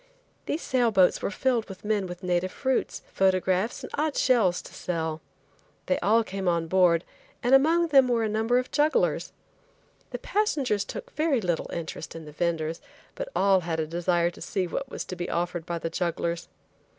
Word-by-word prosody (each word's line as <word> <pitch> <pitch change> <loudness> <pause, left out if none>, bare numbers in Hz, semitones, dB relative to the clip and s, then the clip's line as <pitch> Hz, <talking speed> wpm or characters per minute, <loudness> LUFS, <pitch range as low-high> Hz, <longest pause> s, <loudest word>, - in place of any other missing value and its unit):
These 315 - -2
sail 250 -3 +2
boats 190 -4 +4
were - - -1
filled 235 +1 0
with 195 +1 -10
men 210 -3 0
with 180 +1 -9
native 180 0 0
fruits, 260 -1 -1
photographs 190 +2 +1
and - - -7
odd 300 0 -1
shells 215 -9 +3
to - - -12
sell. 160 -2 -3 0.6
They 275 - +1
all 225 +3 +3
came 195 -3 -4
on 170 -1 +2
board, 175 -1 +4 0.4
and 245 +2 +2
among 325 +5 +5
them 270 -3 +6
were 235 -2 +1
a - - +1
number 220 +3 +1
of 255 0 -1
jugglers. 300 +2 +1 0.8
The - - -4
passengers 280 - 0
took - - -7
very 305 -4 +1
little 175 -6 -1
interest 160 -2 -6
in 165 -1 -8
the 150 - -10
venders, 165 0 -2 0.3
but - - -5
all 195 -1 +4
had 165 -2 -3
a 160 - 0
desire 175 +1 +1
to - - -15
see 190 -2 -1
what 265 +10 -4
was - - -5
to 185 - -6
be 175 0 -4
offered 175 -1 -2
by 170 - -2
the 165 0 -4
jugglers. 170 -1 -2
190 Hz, 185 wpm, -27 LUFS, 170-250 Hz, 0.8 s, them